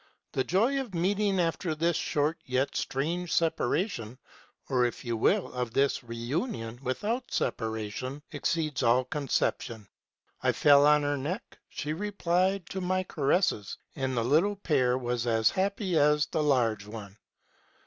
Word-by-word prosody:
The 130 - 0
joy 235 - +2
of 230 -9 -8
meeting 195 +2 +1
after 165 -1 0
this 165 +2 +1
short 150 +3 0
yet 130 +2 0
most - - -4
strange 165 +6 -2
separation, 160 - 0 0.5
or, 130 -2 +2
if 120 - -4
you 120 -1 -1
will, 190 - +1
of 125 -2 -3
this 140 -2 +2
re 115 -1 -7
union 120 - -3
without 205 - -2
separation, 110 +5 -3
exceeds 155 -1 -1
all 125 +2 +4
conception. 125 -6 -2 0.5
I - - +2
fell 145 0 +6
on 150 0 +5
her 145 0 0
neck: 175 - -5
she 150 +1 -4
replied 185 0 0
to 190 - -3
my 185 +1 0
caresses, 145 - 0 0.2
and 130 -2 -2
the 115 - +2
little 160 - +3
pair 135 -10 +1
was 120 -1 -2
as 110 -1 +3
happy 195 -1 -1
as 150 0 +4
the 155 - -2
large 115 -8 +1
one. 105 -2 -9
145 Hz, 150 wpm, -29 LUFS, 125-180 Hz, 0.5 s, fell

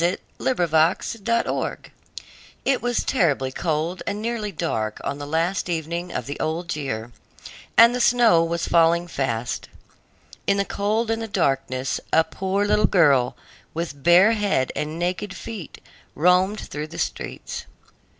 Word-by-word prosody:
THE 175 +2 +2 0.2
LITTLE 250 -10 +1
MATCH 160 +2 +3 0.2
SELLER 230 +1 0 0.9
It 270 -2 +2
was 245 -1 0
terribly 145 - +1
cold 160 +5 -2
and 205 - -2
nearly 220 -2 -2
dark 110 - -2
on 140 +1 -3
the 145 - -6
last 170 +5 0
evening 170 +1 -3
of - - -3
the 145 - -6
old 170 +2 -2
year, 120 -6 -4 0.7
and 235 +1 +8
the 250 - -1
snow 235 -9 +5
was 170 0 -2
falling 170 +1 +3
fast. 120 -7 -3 0.8
In 200 - +3
the 200 - +1
cold 215 +4 -1
and 225 0 -1
the 225 - -4
darkness, 135 -8 0
a 160 - +5
poor 190 +4 -1
little 205 -1 +3
girl, 140 -8 +3 0.4
with 165 -4 -4
bare 175 +7 +6
head 205 - +1
and 155 +2 -3
naked 180 +3 -2
feet, 215 -8 -8 0.4
roamed 180 +5 +3
through 150 +1 -6
the 165 - -10
streets. - - -4
170 Hz, 150 wpm, -23 LUFS, 150-205 Hz, 0.9 s, and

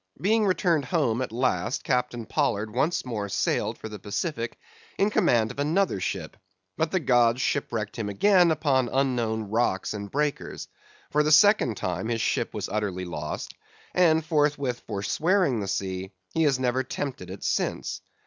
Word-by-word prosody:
Being 215 +2 +2
returned 170 -6 +2
home 130 -6 +1
at 130 - -3
last, 115 -3 0
Captain 125 -2 -1
Pollard 105 0 -1
once 145 +7 0
more 105 -5 -3
sailed - - 0
for - - -7
the 105 -1 -8
Pacific 115 - -3 0.4
in 200 +2 +2
command 120 - +3
of 125 - -10
another 160 - +1
ship, 90 -1 -4 0.4
but 160 0 0
the 185 - +1
gods 120 -5 +3
shipwrecked 110 -3 -2
him 105 -2 -2
again 180 - +4
upon 140 -6 +2
unknown 115 -6 0
rocks 110 -4 0
and 100 -1 -6
breakers; 145 +3 -2 0.4
for 150 - +3
the 150 0 +1
second 155 - +5
time 90 +3 -2
his 115 -1 -1
ship - - 0
was - - -4
utterly 95 -3 -2
lost, 75 -3 -5 0.4
and 160 -3 +4
forthwith 145 -5 +1
forswearing 125 - +1
the 100 - -3
sea, 95 -1 -3 0.2
he 165 - +1
has 140 -3 +3
never 130 0 +1
tempted 135 0 -5
it - - -8
since. - - -1
125 Hz, 160 wpm, -26 LUFS, 105-155 Hz, 0.4 s, second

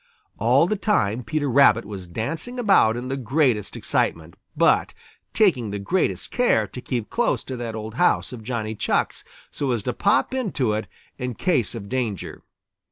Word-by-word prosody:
All 125 +8 +4
the 215 - 0
time 125 - +1
Peter 155 +2 -1
Rabbit 120 -5 +5
was 100 -3 -7
dancing 160 - -4
about 195 - +4
in 125 +1 -5
the 135 - -2
greatest 130 -4 0
excitement, 80 0 -1 0.2
but - - +3 0.4
taking 150 - +2
the 100 - -3
greatest 170 - -1
care 240 - +2
to 125 +5 -9
keep 120 -4 -4
close 240 - +1
to 130 - -6
that 115 -2 -5
old 110 0 -6
house 175 -1 +1
of 120 - -8
Johnny 110 -2 -3
Chuck's 105 - -1 0.3
so 140 - -2
as 120 -5 0
to 125 - -2
pop 200 - +2
into 185 - 0
it 110 +1 -3 0.3
in 125 -1 -3
case 130 - 0
of 100 -3 -7
danger. 120 -5 -3
125 Hz, 170 wpm, -23 LUFS, 110-155 Hz, 0.4 s, Rabbit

